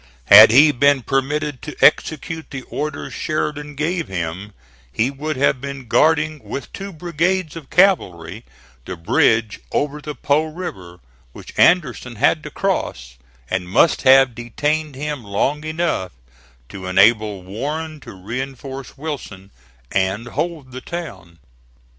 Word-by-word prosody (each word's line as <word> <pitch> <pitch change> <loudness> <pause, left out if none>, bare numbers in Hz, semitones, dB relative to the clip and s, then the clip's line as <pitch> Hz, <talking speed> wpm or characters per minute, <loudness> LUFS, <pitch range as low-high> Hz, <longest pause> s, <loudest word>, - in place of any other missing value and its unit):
Had 105 - +10
he 145 +7 +7
been 140 0 +3
permitted 140 +1 -1
to 150 - -8
execute 160 +1 +2
the 135 -2 -7
orders 150 +2 -5
Sheridan 150 -1 -3
gave 165 +3 -2
him, 90 +3 -5 0.4
he 115 - 0
would 150 +1 -4
have 135 -1 +1
been 140 -2 -7
guarding 155 +3 +2
with 140 - -7
two 195 0 -7
brigades 175 0 -1
of 160 -5 -10
cavalry 105 - +1 0.4
the 90 - -6
bridge 110 +6 +2
over 150 +1 -1
the 150 0 -6
Po 145 +5 +1
River 100 - -8 0.3
which - - -12
Anderson 150 -8 +2
had - - +2
to - - -8
cross, - - -3 0.3
and 90 +2 -3
must 145 - +3
have 135 -1 +6
detained 145 +6 -2
him 145 -1 -4
long 130 +9 -1
enough 155 - -2 0.6
to 95 -1 -8
enable 100 +1 +3
Warren 150 - -5
to 125 -3 -11
reinforce 130 +7 -7
Wilson 125 -10 -7 0.4
and 95 +5 -1
hold 160 -3 -4
the 130 +1 -8
town. 95 - -8
135 Hz, 135 wpm, -20 LUFS, 105-155 Hz, 0.6 s, Had